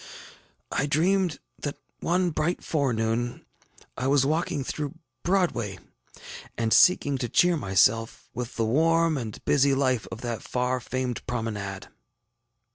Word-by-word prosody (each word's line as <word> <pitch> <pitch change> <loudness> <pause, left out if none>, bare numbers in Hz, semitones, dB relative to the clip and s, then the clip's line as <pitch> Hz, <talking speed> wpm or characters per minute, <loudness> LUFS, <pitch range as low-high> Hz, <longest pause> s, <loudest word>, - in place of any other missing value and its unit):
ŌĆ£I 145 - 0
dreamed 175 +1 +2 0.2
that 145 - -4 0.2
one 180 +1 +1
bright 170 +3 -1
forenoon 120 -4 -1 0.5
I 125 - -2
was 135 -1 +4
walking 155 -1 0
through 145 +3 -4 0.2
Broadway, 170 - 0 0.8
and 115 -1 +1
seeking 145 -7 +5
to 120 - -2
cheer 175 +7 +4
myself 115 - +1
with 125 -1 -5
the 115 - 0
warm 165 +6 +3
and 115 -6 -6
busy 140 -1 +4
life 130 -4 +1
of 115 - -7
that 120 -2 -3
far 125 +1 -1
famed 125 0 -3
promenade. 105 -5 -4
130 Hz, 125 wpm, -26 LUFS, 115-155 Hz, 0.8 s, seeking